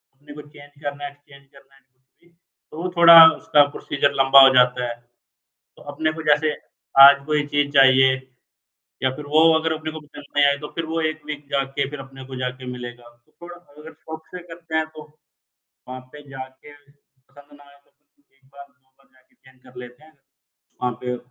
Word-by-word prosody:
अपने 145 +2 -16
को 150 - -11
चेंज 145 -1 -18
करना 145 0 -6
है, - - -6
एक्सचेंज 140 -1 -21
करना 135 0 -22
है, 135 - -26
कुछ 130 0 -48 0.2
भी, 175 - -28 0.4
तो 160 - -9
वो 180 - -4
थोड़ा 170 -1 +8 0.2
उसका 145 -1 +3
प्रोसीजर 140 0 -2
लंबा 135 +1 +6
हो 135 - +2
जाता 125 0 +2
है। 120 - -6 0.8
तो - - -17
अपने 155 +2 -2
को - - -6
जैसे 150 +1 +2 0.5
आज 140 0 +5
कोई 150 -1 -1
चीज़ 145 -1 0
चाहिए 130 -1 +4 0.9
या 130 - +2
फिर 150 - -10
वो 155 +2 +3 0.2
अगर 160 0 -2
अपने 155 0 -7
को 155 - -9
पसंद 145 -1 -15
नहीं 145 - +3
आये, 140 0 +1
तो 150 +1 -9
फिर 165 -1 -4
वो 165 +1 -4
एक 155 0 -15
वीक 150 -1 -8
जा 140 -1 -1
के 140 -1 -1
फिर 145 -1 -9
अपने 135 0 -12
को 130 0 -10
जाके 125 0 -6
मिलेगा। 120 -1 -10 0.2
तो - - -35
थोड़ा 175 0 -11
अगर 160 -2 -16
शॉप 160 +1 -11
से - - -7
करते 165 -1 -9
हैं, 160 0 0
तो, 155 -1 -14 0.9
वहाँ 130 0 -8
पे 150 - -13
जाके 130 +2 -12
पसंद 145 0 -24
ना 145 - -20
आये, 140 0 -22
तो - - -37
फिर 145 -1 -43
1 135 - -35
बार 140 0 -13
2 140 -1 -41
बार 135 - -31
जाके 130 0 -32
चेंज 130 -1 -25
कर 125 - -15
लेते 125 +4 -13
हैं। 155 -1 -23 0.6
वहाँ 125 - -1
पे। 125 0 -4
145 Hz, 210 wpm, -20 LUFS, 130-150 Hz, 0.9 s, थोड़ा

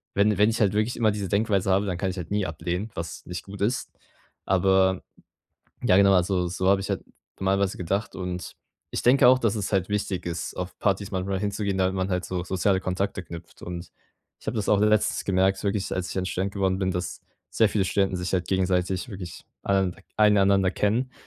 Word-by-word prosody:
wenn 100 0 +3
wenn 105 +2 +5
ich 115 - -1
halt 105 -1 +3
wirklich 110 +3 0
immer 110 -3 +3
diese 100 -2 -4
Denkweise 100 -1 +1
habe, 100 +2 +3
dann 90 -2 -2
kann 95 +1 -1
ich 95 - -5
halt 90 -1 -6
nie 105 -1 +1
ablehnen, 90 +6 -3
was 85 0 -6
nicht 90 -1 -5
gut 100 0 -9
ist. 115 +5 -1 0.5
Aber, 95 0 +3 0.8
ja 90 - +5
genau, 100 0 +6
also, 90 0 +2
so 95 +1 -2
habe 100 0 +4
ich 95 - -5
halt - - -2 0.4
normalerweise 95 0 +1
gedacht. 100 +4 -2
Und 90 -1 -5 0.4
ich - - -2
denke 125 +1 +6
auch, 130 +1 +6
dass 115 -4 +1
es 105 -2 -3
halt 95 0 +1
wichtig 100 -3 -2
ist, 85 -1 -4
auf 90 0 -5
Partys 100 0 0
manchmal 95 0 -2
hinzugehen, 100 -1 -1
damit 95 +1 +1
man 95 +1 -1
halt 90 0 0
so 90 -2 -3
soziale 95 +1 +1
Kontakte 95 0 -2
knüpft. 85 0 -11
Und 85 -1 -7 0.5
ich - - -19
habe 110 - -1
das 105 - -1
auch 105 - +4
letztens 105 0 +2
gemerkt, 95 0 +2
wirklich, 100 -1 -1
als 90 -1 -3
ich - - -5
dann 95 -1 -1
Student 95 +1 -2
geworden 95 -2 +1
bin, 95 -1 0
dass 90 0 -4 0.3
sehr 110 - +3
viele 100 -2 +1
Studenten 95 -1 +1
sich 90 +1 -3
halt 90 -2 0
gegenseitig 95 +1 0
wirklich 90 -5 -8 0.2
alle 100 -1 +2
nander 90 +1 -4 0.2
ein 105 -1 +5
einander 95 -1 +4
kennen. 120 +7 0
95 Hz, 215 wpm, -26 LUFS, 90-100 Hz, 0.8 s, genau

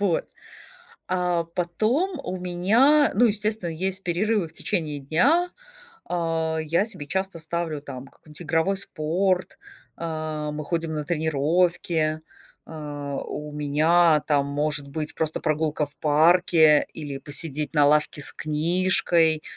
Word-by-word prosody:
Вот, 195 -5 +1 0.8
а 180 -2 0
потом 230 - 0
у 185 +1 -4
меня, 215 +12 +3
ну, 240 +5 +4
естественно, 215 -3 0
есть 190 +4 -3
перерывы 185 +1 0
в 160 - -19
течение 160 -6 -2
дня. 280 - +2 0.6
А, 165 -2 -1
я 165 +5 +1
себе 185 -10 -7
часто 190 0 -2
ставлю 160 -2 -3
там 135 -2 -9
какой-нибудь 150 +3 -13
игровой 165 +4 +1
спорт, 185 +1 -1 0.4
а, 155 -2 -4
мы 150 0 -5
ходим 165 +1 -2
на 150 -1 -3
тренировки, 160 0 0 0.4
а, 145 -3 -6
у 150 0 -6
меня 155 +2 +3
там 145 -2 +2
может 145 0 -1
быть 155 +1 -4
просто 160 -1 -1
прогулка 155 -1 0
в 145 - -20
парке 160 0 +4
или 145 -3 -5
посидеть 150 0 -3
на 145 -1 +5
лавке 150 0 +2
с - - -2
книжкой. 165 0 +1
160 Hz, 130 wpm, -24 LUFS, 150-180 Hz, 0.8 s, на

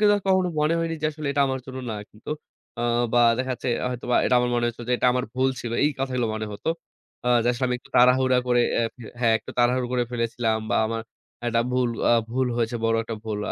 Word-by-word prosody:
কিন্তু 205 -1 +5
কখনো 185 -1 +3
মনে 155 +2 +2
হয়নি 165 0 -1
যে, 155 - +3
আসলে 150 -1 -6
এটা 140 - +3
আমার 130 -1 -2
জন্য 130 0 -7
না, - - -3 0.2
কিন্তু 105 +7 -11 0.5
আ - - -1 0.3
বা 120 - +5 0.2
দেখা 130 0 -1
যাচ্ছে, 125 - -4 0.2
হয়তোবা 125 0 -1
এটা - - +3
আমার 125 - 0
মনে 120 0 +1
হয়েছিল 120 0 -4
যে, - - +2
এটা - - +2
আমার 125 0 0
ভুল 130 +1 +2
ছিল। 120 -1 -5
এই 150 - +3
কথাগুলো 125 -3 0
মনে 110 0 -3
হত। 100 - -10 0.6
আ - - +3
যে, - - -2
আসলে 125 +2 -2
আমি 125 - 0
একটু - - -22
তাড়াহুড়া 125 +1 +5
করে 120 -1 +3
এ্যা 115 - +2 0.3
হ্যাঁ, 115 -2 +4
একটু - - -11
তাড়াহুড়ো 125 +1 +3
করে 125 -1 +1
ফেলেছিলাম 115 -1 0
বা - - +2
আমার 115 0 -3 0.4
একটা 115 0 +2
ভুল 125 -1 +2 0.2
আ - - +6 0.2
ভুল 130 +2 +1
হয়েছে, 120 0 0
বড় 115 0 +3
একটা 115 - -4
ভুল। 105 -2 -3
125 Hz, 230 wpm, -24 LUFS, 115-130 Hz, 0.6 s, আ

